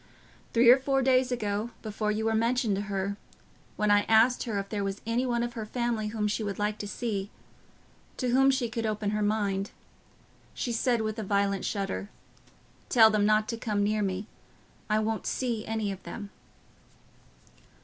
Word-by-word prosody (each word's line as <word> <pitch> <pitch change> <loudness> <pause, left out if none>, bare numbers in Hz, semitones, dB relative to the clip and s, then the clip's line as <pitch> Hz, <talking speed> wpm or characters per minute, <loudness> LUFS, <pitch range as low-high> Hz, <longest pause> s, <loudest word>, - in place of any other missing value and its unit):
Three 235 +1 +7
or 260 - +6
four 270 0 +1
days 255 0 +3
ago, 215 -1 -2
before 215 -1 -2
you 215 +1 -1
were 225 - +2
mentioned 230 -1 +1
to 195 - -2
her, 200 0 -2 0.6
when 210 -1 +1
I 205 0 +6
asked 225 +4 +4
her 220 -4 -2
if 200 0 -3
there 205 -2 -2
was 195 0 -3
any 235 +3 0
one 235 -1 0
of 240 0 -3
her 225 - -4
family 230 -1 -2
whom 210 -1 -1
she 210 +2 -1
would 200 -2 -3
like 210 0 -1
to 205 - -4
see—to 215 +3 -7
whom 265 +2 +5
she 260 -3 +1
could 225 -1 -3
open 210 -1 -1
her 210 0 -1
mind—she 205 +3 -4
said, 235 0 +1
with 215 +1 -3
a - - -2
violent 200 -1 0
shudder, 200 0 -3 0.8
'Tell 225 -2 +7
them 210 -1 +2
not 215 0 +3
to 230 - -2
come 210 -3 -1
near 210 +1 +1
me—I 200 +2 -5
won't 220 0 -1
see 235 -4 -2
any 220 -2 -1
of 195 - -7
them. 205 -2 -8
215 Hz, 175 wpm, -28 LUFS, 205-235 Hz, 0.8 s, Three